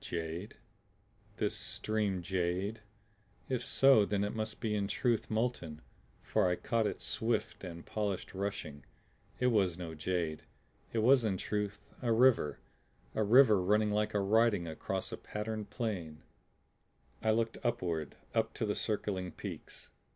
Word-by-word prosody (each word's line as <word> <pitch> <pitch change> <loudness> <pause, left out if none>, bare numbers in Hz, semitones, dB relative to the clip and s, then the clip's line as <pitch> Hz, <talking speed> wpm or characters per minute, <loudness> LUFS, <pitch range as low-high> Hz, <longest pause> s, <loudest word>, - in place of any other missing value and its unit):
Jade? 85 +3 -4 0.8
This - - 0
stream 105 -4 -1
jade? 95 +4 -1 0.7
If 130 -2 0
so 135 -6 +6
then 100 0 0
it 105 - -2
must 110 -1 -4
be 110 -2 -1
in 100 -1 0
truth 110 +3 0
molten, 110 - -2 0.4
for 105 -4 +2
I 90 - +2
caught 115 +3 0
its - - -4
swift 110 -2 -1
and 85 -2 -7
polished 105 -3 -2
rushing! 95 -7 -4 0.6
It 125 0 +3
was 95 -5 +2
no 85 -3 -5
jade. 80 -1 -2 0.5
It 110 -2 0
was 130 +1 +6
in 100 -4 0
truth 105 +1 -3 0.2
a 120 -2 +1
river; 115 - +4 0.6
a - - 0
river 110 -2 +6
running 105 +3 +3
like 105 0 0
a - - +4
writing 105 -1 +3
across 80 - -3
a - - -4
patterned 105 0 -4
plane. 90 -10 -4 1.0
I 110 - +1
looked 115 +1 +1
upward 85 -10 -1 0.2
up - - 0
to - - -1
the - - 0
circling 95 -4 -2
peaks. - - -8
105 Hz, 145 wpm, -33 LUFS, 90-110 Hz, 1.0 s, so